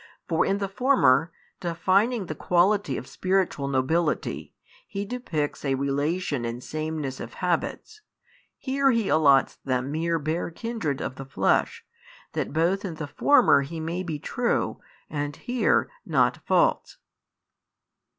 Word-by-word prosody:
For 165 -2 +2
in 195 - +1
the 200 -1 -2
former, 175 - +3 0.3
defining 190 +6 +1
the 155 - -4
quality 180 -2 +2
of - - -6
spiritual 185 -4 0
nobility, 145 +5 -1 0.3
He 200 0 -4
depicts 195 - -3
a 135 -2 +1
relation 140 +1 -1
in 120 +1 -4
sameness 155 -2 -4
of - - -8
habits, 435 -1 -2 0.6
here 275 0 +1
He 230 -5 +1
allots 140 -4 +4
them 130 0 -2
mere 165 +2 0
bare 160 +3 -2
kindred 170 - -3
of - - -3
|681 - - -24
the 135 - -7
flesh, 460 - 0 0.5
that - - -2
both 170 +6 +1
in 180 -5 -4
the 155 - -5
former 255 - +4
He 160 +4 -6
may 165 +3 -3
be 165 -4 -4
true, - - -1 0.3
and 145 -1 -3
here 245 -1 +1 0.2
not - - +2
false. - - +2
165 Hz, 140 wpm, -26 LUFS, 140-195 Hz, 0.6 s, allots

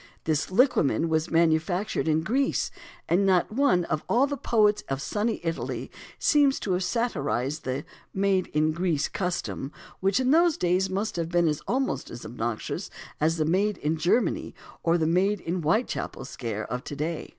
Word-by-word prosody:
This 155 -2 0
liquamen 185 - +2
was 160 +1 0
manufactured 165 +4 +1
in 155 0 +2
Greece, 265 +9 0 0.4
and 180 +4 +3
not 190 -1 +3
one 225 -8 +2
of 155 -2 -2
all 250 +4 +4
the 285 0 -3
poets 210 -5 +2
of 135 0 -1
sunny 210 +9 -1
Italy 165 -1 -3 0.3
seems 285 -3 +3
to 190 - -1
have 180 +1 0
satirised 155 - -1
the 130 +3 -3 0.3
"made 195 -1 +1
in 155 +1 +1
Greece" 165 -3 0
custom, 180 -6 -3 0.3
which 195 +3 +2
in 260 0 +2
those 335 0 +4
days 180 +2 +1
must 195 +1 -2
have 165 -1 -2
been 170 -3 +3
almost 265 +2 -1
as 120 - -9
obnoxious 115 0 -4 0.3
as 160 +2 +2
the 155 - +1
"made 195 +5 +1
in 150 +2 -1
Germany" 175 +10 0 0.3
or 170 +1 +2
the 160 - +1
"made 185 +5 +2
in 175 +1 -3
Whitechapel" 165 - -1
scare 115 -5 -4
of 125 +1 -4
to 145 - -6
day. 155 +3 -3
175 Hz, 170 wpm, -26 LUFS, 155-210 Hz, 0.4 s, all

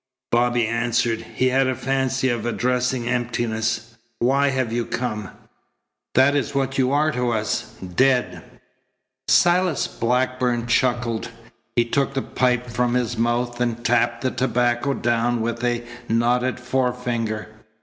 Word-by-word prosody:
Bobby 120 0 +2
answered. 115 0 0
He 130 - +2
had 135 +1 +2
a 130 - 0
fancy 130 0 0
of 120 -3 -1
addressing 125 0 0
emptiness. 115 -1 -2 0.2
"Why 135 +4 +2
have 130 -4 -1
you 120 0 0
come? 105 -5 -3 0.9
That 135 +3 +5
is 145 0 -1
what 135 0 0
you 130 0 +2
are 150 +2 +2
to 125 -3 -1
us 110 0 -2 0.2
dead." 125 -9 +2 0.9
Silas 175 -2 +3
Blackburn 125 0 0
chuckled. 120 -2 0 0.5
He 120 - +3
took 135 +3 0
the 135 - 0
pipe 125 -1 0
from 120 +1 0
his 125 -1 0
mouth 120 +1 -1
and 120 -1 -1
tapped 120 0 +2
the 130 - +1
tobacco 120 +2 0
down 120 0 +1
with 115 +1 -3
a 120 -1 0 0.3
knotted 125 +3 +1
forefinger. 125 -4 -2
120 Hz, 135 wpm, -22 LUFS, 115-130 Hz, 0.9 s, That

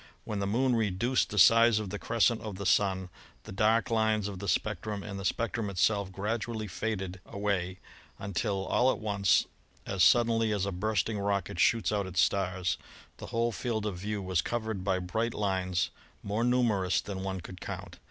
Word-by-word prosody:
When 105 - -4
the 100 - -1
Moon 125 +4 +2
reduced 115 +3 +1
the 105 - -5
size 115 +1 +7
of 105 -3 -3
the 105 - -4
crescent 115 0 +2
of 105 -3 -6
the 100 +1 -6
Sun 95 -1 +2 0.3
the - - -10
dark 110 +4 +2
lines 110 -2 +2
of 100 -3 -6
the 100 - -5
spectrum 105 -1 -1
and 100 -2 -6
the - - -6
spectrum 115 +1 -1
itself 100 +1 +1
gradu 110 +4 -3
ally 110 -1 -3
faded 95 -2 -4
away 100 -3 -2 0.4
until 100 0 -2
all 130 +2 +3
at - - -3
once, 100 -4 +2 0.4
as 95 -3 +1
suddenly 115 +1 +4
as 100 -2 0
a 100 - -2
bursting 105 +3 -1
rocket 100 -2 -1
shoots 115 0 +3
out 100 -2 -1
its 90 -1 -2
stars, 90 +1 +1 0.4
the - - -8
whole 115 0 0
field 110 -2 -2
of 100 -4 -3
view 105 +1 -3
was 90 -3 +1
covered 110 -4 -3
by 95 -1 +1
bright 110 +6 -2
lines 95 -3 0 0.3
more 105 +3 -1
numerous 115 -7 +2
than 95 -2 -5
one 95 -1 -3
could 90 +1 -10
count. - - -7
100 Hz, 185 wpm, -30 LUFS, 95-110 Hz, 0.4 s, size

